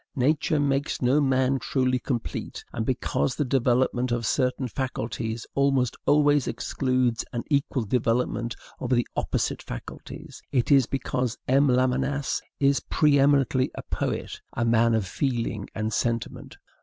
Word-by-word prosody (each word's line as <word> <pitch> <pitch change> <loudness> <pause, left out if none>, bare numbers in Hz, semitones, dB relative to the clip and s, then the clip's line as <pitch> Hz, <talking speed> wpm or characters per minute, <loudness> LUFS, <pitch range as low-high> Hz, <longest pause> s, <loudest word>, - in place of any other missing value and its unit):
Nature 150 +4 +2
makes 140 0 0
no 135 +4 +3
man 130 -1 +2
truly 130 0 0
complete, 125 -2 -4
and 110 -1 -3
because 130 0 0
the 150 - 0
development 125 -1 +1
of 120 -1 -1
certain 125 +5 0
faculties 115 -3 -4
almost 135 -3 +2
always 145 -2 +4
excludes 130 -3 0
an 120 - -2
equal 140 -3 +1
development 120 +1 0 0.2
of 125 - -4
the 120 -2 +2
opposite - - -1
faculties; - - -9
it 125 +1 +1
is 135 -4 +5
because 125 -2 -2
M. 135 +3 +4
Lamennais 130 +2 +1 0.2
is 140 0 +3
preeminently 140 -3 +3
a - - -6
poet, - - -3
a 120 - 0
man 115 0 +3
of 110 -3 0
feeling 115 -2 -2
and 110 0 -2
sentiment. 115 -1 -2
130 Hz, 135 wpm, -26 LUFS, 120-140 Hz, 0.2 s, is